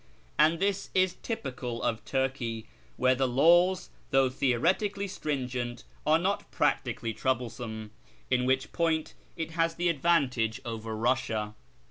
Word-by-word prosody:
And 160 +2 +5
this 200 0 0
is 185 -1 +3
typical 125 - -4
of 115 -1 -1
Turkey, 130 -4 -1 0.3
where 130 - +4
the 130 0 +1
laws, 175 +8 +4 0.2
though 135 -2 +3
theoretically 185 - +1
striugent, 125 -8 -3 0.2
are 155 +1 +6
not 190 +4 -1
practically 115 -1 0
trouble 125 -2 -1
some; 110 -3 -7 0.4
in 125 0 +3
which 130 0 +1
point 160 -2 0 0.2
it 165 -1 -3
has 165 0 +1
the 175 +1 +1
advantage 135 -8 +2
over 115 -1 -4
Eussia. 110 -2 0
130 Hz, 130 wpm, -29 LUFS, 120-170 Hz, 0.4 s, are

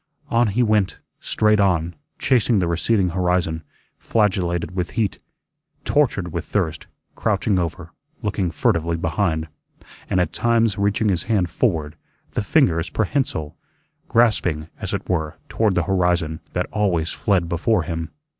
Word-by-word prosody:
On 120 0 +3
he 110 +5 +1
went, 105 -4 +2 0.2
straight 105 0 +2
on, 85 -4 +2 0.2
chasing 120 -3 +2
the 90 -3 +1
receding 90 +3 +1
horizon; 90 -2 0 0.4
flagellated 90 -5 0
with 90 -2 -1
heat; 110 -4 0 0.7
tortured 105 - +1
with - - -2
thirst; - - -2 0.3
crouching 100 -4 +1
over; 85 -3 -4 0.3
looking 100 -3 0
furtively 85 0 +1
behind, 80 -1 0 0.6
and 95 - +2
at 90 -3 0
times 115 -3 +2
reaching 100 +2 +1
his 90 -4 +1
hand 95 -7 +1
forward, 80 -9 0 0.3
the - - -1
fingers 80 0 +2
prehensile, 110 - -1 0.5
grasping, 90 -9 +2
as - - -4
it - - -3
were, 80 -4 -1
toward 110 -4 +1
the 90 - +2
horizon, 90 -3 +1
that - - 0
always 90 -6 0
fled 95 -5 +1
before 85 +3 +1
him. 80 -1 -4
90 Hz, 135 wpm, -22 LUFS, 85-105 Hz, 0.7 s, On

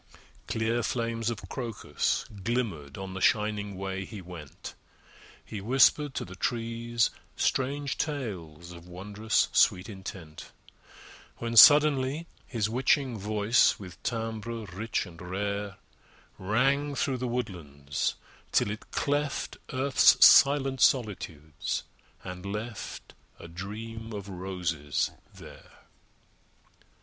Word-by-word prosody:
Clear 115 +1 0
flames 115 -1 -1
of 115 -3 -5
Crocus 115 - -2 0.2
glimmered 100 - -2
on 95 -1 -6
The 95 - -6
shining 105 -4 +1
way 95 0 -3
he 105 +2 -8
went. 85 -5 -10 0.7
He 105 - -6
whispered 130 +5 +4
to - - -2
the 95 - -10
trees 115 +2 -1 0.2
strange 140 +2 -1
tales 90 - -4
Of 85 0 -12
wondrous 105 +5 0
sweet 90 +4 +3
intent, 95 -6 -9 0.8
When, 115 0 -4
suddenly, 145 +3 +7 0.2
his 110 -5 -1
witching 125 +1 +1
voice 105 +3 +3
With 90 -4 -11
timbre 115 -1 -3
rich 110 +4 -2
and 85 -2 -13
rare, 100 +2 -3 0.6
Rang 135 +9 +1
through 130 0 0
the 125 0 -3
woodlands 80 - -3 0.4
till 105 - +2
it 105 - -8
cleft 145 0 -1
Earth's 130 +1 +6
silent 135 -2 +6
solitudes, 85 - 0 0.4
and 90 -1 -7
left 105 +2 -6 0.2
A - - -10
Dream 110 +6 -7
of 100 -1 -6
Roses 90 -6 -2 0.2
there! - - -15
110 Hz, 110 wpm, -28 LUFS, 95-120 Hz, 0.8 s, suddenly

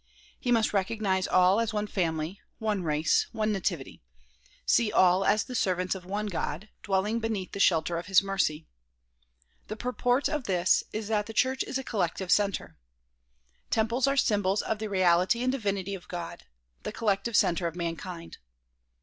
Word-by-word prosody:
He 245 - -1
must 225 -3 +2
recognize 195 -1 0
all 185 +3 +4
as 230 -1 -1
one 210 0 0
family, 170 -2 -2 0.2
one 215 -3 -1
race, 155 -1 +1
one 215 -1 0
nativity; 175 -8 -3 0.6
see 225 -3 +3
all 185 +1 +4
as 210 +2 +3
the 255 - -9
servants 185 -5 0
of 185 -2 -8
one 205 +3 -3
God, 185 0 -4
dwelling 205 +3 0
beneath 220 -5 -3
the 200 - -6
shelter 170 -2 +2
of 175 - -9
his 195 0 +5
mercy. 180 -6 -1 1.0
The 215 - -5
purport 250 +3 0
of 300 -5 -3
this 180 -1 +2
is 215 -1 -4
that 210 -2 0
the 225 - -7
church 260 +4 +1
is - - -2
a 265 - -4
collective 190 -5 -2
center. 195 - +1 0.9
Temples 230 +4 +1
are 275 0 +1
symbols 205 -5 +2
of 220 - -2
the 215 0 -4
reality 185 +4 +3
and 255 - +2
divinity 200 -6 -2
of 190 -2 -8
God; 175 -2 -7 0.4
the - - -5
collective 220 +1 -1
center 170 0 +2
of 165 - -6
mankind. 170 0 -6
200 Hz, 165 wpm, -28 LUFS, 180-220 Hz, 1.0 s, his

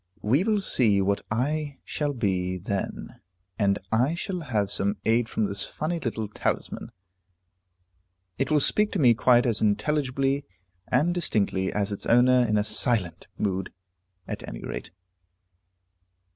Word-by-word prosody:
We 130 - +3
will 210 -1 +1
see 110 - +3
what 100 +1 +1
I 145 +5 -1
shall 145 -1 -2
be 95 -6 -1
then, 95 +2 -4 0.4
and 100 -1 +3
I 125 +8 +2
shall 180 +1 -3
have 110 - -1
some 100 +1 -1
aid 115 +1 +2
from 110 - 0
this 100 -1 -3
funny 165 +3 -3
little 110 -6 -3
talisman; 105 - -3 1.5
it 135 - 0
will 150 -2 +3
speak 210 +8 +2
to 195 - -1
me 125 -5 +6
quite 120 +1 +4
as 115 -3 +1
intelligibly 135 +4 +1 0.4
and 150 +8 +2
distinctly 100 - 0
as 105 0 -1
its 100 - -5
owner 125 +1 +5
in 105 - +2
a 105 - +2
silent 105 -4 0
mood, 95 -2 -2 0.6
at - - -5
any - - -7
rate." - - -6
115 Hz, 145 wpm, -26 LUFS, 100-145 Hz, 1.5 s, me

